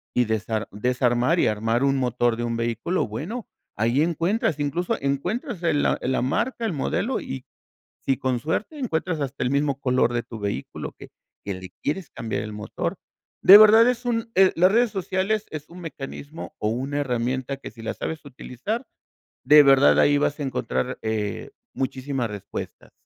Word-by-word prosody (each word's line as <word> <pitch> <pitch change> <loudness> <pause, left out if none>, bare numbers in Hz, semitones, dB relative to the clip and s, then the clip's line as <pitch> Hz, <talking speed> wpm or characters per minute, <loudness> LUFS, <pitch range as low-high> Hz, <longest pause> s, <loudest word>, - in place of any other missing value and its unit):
y 125 - +3
desar 110 -1 -2
desarmar 125 - +1
y - - +3
armar 115 +3 0
un 140 0 +3
motor 120 -2 +1
de 120 - -2
un 115 -1 -2
vehículo, 115 - -1
bueno, 165 - -5 0.3
ahí 115 +6 +2
encuentras, 170 - 0
incluso 155 +5 -1
encuentras 180 - -2
el 155 -4 +2
la - - +2
la 130 - 0
marca, 230 - -1
el 215 - -1
modelo, 205 - -1
y 130 -1 -6 0.6
si 135 - +1
con 130 -2 -1
suerte 185 - -3
encuentras 165 - -1
hasta 135 -3 -3
el 125 - 0
mismo 140 -1 +1
color 125 -2 +2
de 120 -1 -1
tu 115 -1 -9
vehículo 100 -1 -4
que - - -12 0.3
que 100 - -3
le 95 0 -8
quieres 160 +1 -2
cambiar 115 -1 -4
el 105 0 -6
motor, 105 +1 -4 0.5
de 195 - +11
verdad 220 +2 +8
es 250 0 0
un, 230 -1 -1
eh, 190 0 +6
las 180 +3 +5
redes 235 +2 +3
sociales 195 +2 -1
es 150 -1 -7
un 175 +2 -11
mecanismo 150 -1 -8
o 105 - 0
una 135 +5 -2
herramienta 130 +1 -2
que 135 - -9
si 115 - -13
la 110 - -2
sabes 160 -1 -5
utilizar 145 - -5 0.6
de 150 0 +8
verdad 135 0 +6
ahí 145 - +5
vas 145 0 0
a - - -1
encontrar, 65 - -2
eh, 110 -2 -3 0.2
muchísimas 130 -2 -2
respuestas, 105 -2 -8
140 Hz, 175 wpm, -24 LUFS, 120-175 Hz, 0.6 s, de